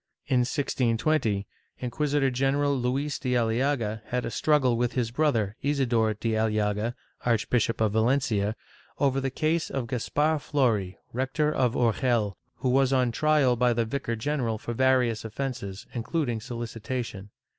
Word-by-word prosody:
^ - - -60 0.2
In 130 - +3
1620, 120 -3 +1 0.3
Inquisitor 140 +2 0
general 140 +2 +1
Luis 135 +3 -1
de 125 -2 -1
Aliaga 115 -1 0
had 125 -1 -1
a - - -3
struggle 135 -1 +2
with 120 +1 0
his 120 -3 -1
brother 115 -7 +1
Isidor 120 -6 +1
de 115 +2 -2
Aliaga, 110 +1 0 0.3
Archbishop 115 0 +1
of 110 -2 +2
Valencia, 110 -3 +1 0.4
over 135 -1 +2
the 135 - -1
case 155 +5 0
of 135 -3 -2
Caspar 150 +6 0
Flori, 115 -10 0 0.2
rector 135 +5 0
of 125 -3 +1
Urgel, 115 -3 +1 0.2
who 130 - -1
was 135 +1 +3
on 130 -2 +2
trial 150 -1 +3
by 125 0 +3
the 115 0 0
vicar 115 0 -2
general 115 -2 -1
for 120 - -5
various 125 -2 +2
offences, 110 -4 -5
including 120 -1 -2
solicitation. 115 -3 -5
125 Hz, 145 wpm, -27 LUFS, 115-135 Hz, 0.4 s, In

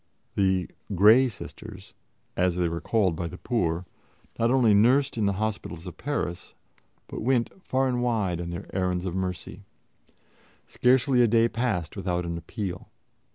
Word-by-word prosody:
The 95 -2 +1 0.3
"Grey 110 +8 +6
Sisters," 105 - -10 0.4
as 90 -1 +1
they 90 -1 +1
were 85 0 -3
called 100 -7 +1
by 85 +1 -3
the 90 - -8
poor, 90 -7 -1 0.5
not 115 0 +3
only 125 -4 +4
nursed 130 +7 +4
in 110 -3 +1
the 100 - +1
hospitals 100 -5 -3
of 90 - -8
Paris, 125 -11 -4 0.5
but - - -7
went 120 0 +1
far 130 +1 +1
and 125 -1 0
wide 105 -8 0
on 85 - -5
their 85 0 -6
errands 90 -1 0
of 90 - -3
mercy. 90 -2 -4 1.0
Scarcely 125 0 +3
a 120 - +5
day 115 +1 +4
passed 110 -9 -2
without 90 -3 -2
an 85 0 -3
appeal. 90 +2 -6
100 Hz, 155 wpm, -26 LUFS, 90-120 Hz, 1.0 s, Grey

